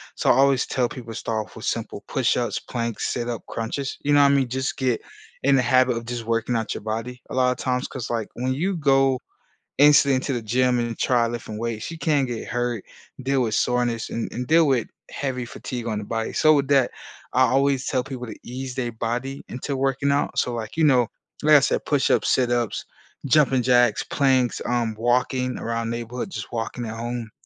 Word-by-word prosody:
So, - - 0
I - - +8
always 135 0 +4
tell 125 -3 +1
people 115 -3 -8
to - - -5
start 110 -2 -2
off - - -19
with - - -8
simple - - -3
push-ups, - - 0
planks, 115 -2 -3
sit-up, 120 -2 -3
crunches, 130 +5 -4
you 145 0 +2
know 145 - +6
what 140 0 +6
I - - +4
mean? 135 -2 +2
Just 130 +2 -2
get 125 -4 0 0.4
in 140 0 +5
the 130 - +4
habit 130 0 +3
of 115 - -6
just 120 -2 -5
working 115 +1 0
out 110 -1 -1
your - - -6
body, 115 +3 -4
a - - -7
lotta 125 -1 +2
times 125 0 0
'cause, 125 -4 -6
like, 115 -3 -2
when 130 +2 -1
you 180 +7 -1
go 135 -3 +3 0.6
instantly 145 -1 +6
into 135 +1 -2
the 120 - -1
gym 125 +2 +2
and 120 -1 -2
try 120 -2 +2
lifting 115 -2 -5
weights, 115 +4 -3
you 165 - -7
can 145 -5 +2
get 120 -2 -5
hurt, 120 -3 -2 0.4
deal 135 0 +1
with 110 -2 -1
soreness, 120 -2 0
and 115 - -3
and 125 0 -4
deal 160 +1 +5
with 130 -4 +2 0.2
heavy 130 -3 -3
fatigue 120 0 -6
on 110 -2 -1
the 105 - -5
body. 115 +1 -3
So 155 0 +5
with 140 -1 +2
that, 135 -3 +4 0.4
I 130 - +4
always 135 +1 +2
tell 130 -2 +1
people 130 -2 -7
to 110 - -8
ease 130 +1 -6
their 120 -3 -2
body 120 +4 -3
into 135 +3 -4
working 135 +1 0
out. 140 - 0
So, 125 - +1
like, 110 +4 -5
you 165 - +2
know, 125 -5 +5 0.4
like 155 0 +7
I - - +7
said, 135 - 0
push-ups, 145 -3 +2
sit-ups, 120 -3 +1 0.4
jumping 135 -3 +4
jacks, 120 -3 +4
planks, 130 -3 +1
um, 120 -2 0
walking 125 +2 +1
around 115 0 -2
neighborhood, 120 +7 -4
just - - -6
walking 115 +1 -3
at 110 +1 -5
home, 120 -1 -4
125 Hz, 210 wpm, -24 LUFS, 115-135 Hz, 0.6 s, I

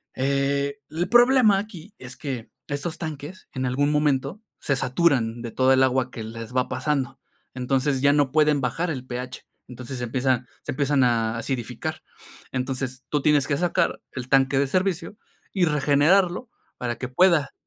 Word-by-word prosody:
Eh, 140 +1 0
el 170 +3 -2
problema 240 -4 +5
aquí 200 -1 -9
es 125 0 -9
que, 130 -5 -5 0.2
estos 145 +3 -3
tanques, 155 +2 -7
en 130 -1 -2
algún 145 +4 +1
momento, 150 +5 0 0.2
se 140 - 0
saturan 125 -4 +1
de 115 - -5
toda 130 +2 +3
el 130 - +4
agua 130 -1 +1
que 115 -3 -7
les 115 +2 -8
va 125 - +2
pasando. 140 -4 -2 0.3
Entonces, 130 +1 0
ya 140 +1 +5
no 145 -3 +2
pueden 150 -1 +3
bajar 165 +8 -1
el 130 -5 -4
pH. 125 +1 -6 0.2
Entonces, 125 +1 -7
empiezan 125 +1 0 0.2
se - - -4
empiezan 140 0 +2
a 115 -2 +1
acidificar. 120 0 -4 0.5
Entonces, 130 0 -3
tú 150 - 0
tienes 145 -2 +3
que 140 - 0
sacar 175 +1 0
el 130 -1 -6
tanque 135 0 +3
de 140 - +3
servicio 185 +4 -1 0.4
y 185 -3 +3
regenerarlo 165 - +2 0.3
para 120 -1 -2
que 130 - -4
pueda. 160 +3 +3
140 Hz, 165 wpm, -24 LUFS, 130-155 Hz, 0.5 s, problema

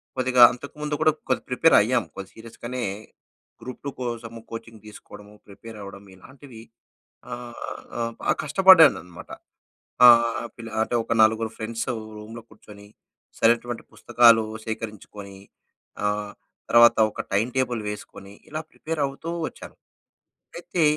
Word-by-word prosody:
కొద్దిగా 130 -1 +2
అంతకుముందు 150 +4 -6
కూడా 155 - +5 0.2
కొద్దిగా 130 - -1
ప్రిపేర్ 160 +6 +4
అయ్యాం. 120 +1 +1
కొద్ది 95 0 -8
సీరియస్‌గానే 120 +2 -7 0.8
గ్రూప్-2 130 +2 -7
కోసము 115 -2 -6
కోచింగ్ 115 -1 -9
తీసుకోవడము, 105 0 -13
ప్రిపేర్ 110 +2 -12
అవ్వడం, 100 0 -11
ఇలాంటివి 130 +3 -14 0.7
ఆహ్, 120 -1 -9
ఆహ్, 115 0 -2
బాగా - - +1
కష్టపడ్డానన్నమాట. 155 - +4 0.8
ఆహ్, 120 -1 +6 0.4
అంటే 115 - -3
ఒక - - -4
నలుగురు 110 0 +2
ఫ్రెండ్స్ 115 +1 -5 0.3
రూమ్‌లో 110 +2 -10
కూర్చొని, 100 -1 -15 0.5
సరైనటువంటి 120 +1 +1
పుస్తకాలు 115 -1 +4 0.2
సేకరించుకొని, 105 -3 -8 0.7
ఆహ్, 105 0 -2 0.4
తర్వాత 120 0 +7
ఒక - - -8
టైమ్ 110 +5 +1
టేబుల్ 125 -3 0
వేసుకొని 100 -1 -10 0.2
ఇలా 155 +1 -5
ప్రిపేర్ 160 -1 -5
అవుతూ 140 +4 -8 0.2
వచ్చాను. - - -13 0.8
అయితే 175 -1 -3
115 Hz, 115 wpm, -24 LUFS, 110-125 Hz, 0.8 s, తర్వాత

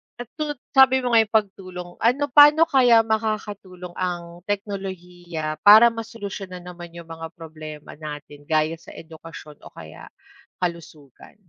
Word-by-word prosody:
At 245 -1 -9
tut 295 -1 -2 0.2
sabi 260 -1 +5
mo 245 - -1
nga 230 - +6
yung 220 0 0
pagtulong, 185 -4 -2
ano 250 +5 +2
pa'no 295 +3 +7
kaya 250 -8 +4
makakatulong 210 -5 -4
ang 175 -1 -4
teknolohiya 180 -6 -5
para 220 +3 +8
masolusyonan 200 -5 -8
naman 175 -1 -11
yung 170 -1 -11
mga 165 0 -7
problema 155 -2 -11
natin 145 -1 -10
gaya 155 +1 0
sa - - -14
edukasyon 160 -2 -12
o - - -14
kaya - - -12 0.5
kalusugan? 165 -6 -7
180 Hz, 135 wpm, -22 LUFS, 165-225 Hz, 0.5 s, para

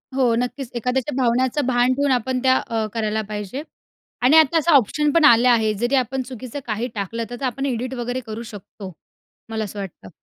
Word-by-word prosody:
हो, 250 -3 +3
नक्कीच. 250 +1 -3
एखाद्याच्या 250 +3 -1
भावण्याचं 255 +3 +1
भान 250 0 +2
ठेऊन 280 0 +1
आपण 255 +1 0
त्या 260 0 +5
अ, 225 -1 -1
करायला 220 -1 -1
पाहिजे. 210 +7 -5 0.6
आणि 275 +6 +6
आता 320 +1 +5
असं 330 +2 +2
ऑप्शन 290 +4 +3
पण 330 -1 +4
आले 235 -2 +6
आहे. 220 -3 +3
जरी 240 +6 0
आपण 260 +1 0
चुकीचं 255 +2 -7
काही 225 +3 -2
टाकलं, 230 +3 -3
तर 245 +2 -7
आपण 270 +2 -2
एडिट 255 0 -2
वगैरे 245 +1 -3
करू 220 +1 -6
शकतो, 195 -1 -10 0.6
मला 220 -1 -2
असं 205 0 -7
वाटतं. 175 - -8
245 Hz, 190 wpm, -21 LUFS, 225-265 Hz, 0.6 s, आणि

